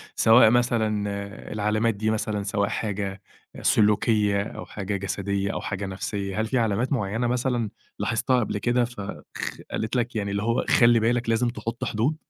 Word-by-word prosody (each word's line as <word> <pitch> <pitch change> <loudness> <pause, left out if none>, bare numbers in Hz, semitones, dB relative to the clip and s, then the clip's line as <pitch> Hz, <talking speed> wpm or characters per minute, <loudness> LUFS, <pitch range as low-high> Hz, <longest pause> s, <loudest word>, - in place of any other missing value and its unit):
سواء 110 0 +7
مثلًا 110 -3 +1 0.5
العلامات 110 +2 +1
دي 110 +2 -1
مثلًا، 105 -1 -1
سواء 100 0 0
حاجة 100 -3 -3 0.4
سلوكيَّة، 105 -1 +3
أو - - -7
حاجة 100 0 -4
جسديَّة، 100 0 -2
أو - - -3
حاجة 100 -1 -3
نَفْسيَّة، 100 +1 -3
هل - - 0
في 130 - 0
علامات 115 +4 +1
معيَّنة 115 +1 -1
مثلًا، 120 -2 0 0.3
لاحظتها 115 +5 +1
قبل 110 -3 -1
كده، 120 +3 +2
فخ 120 -5 -6 0.6
قالت 110 +3 -2
لك، 120 -1 -1
يعني 100 -2 -1
اللي 100 +1 -1
هو، 115 +2 +1
خلِّي 120 -1 +5
بالك، 120 +1 +1
لازم 115 +2 +2
تحُط 120 -1 -4
حدود؟ 120 +9 0
110 Hz, 160 wpm, -25 LUFS, 100-120 Hz, 0.6 s, سواء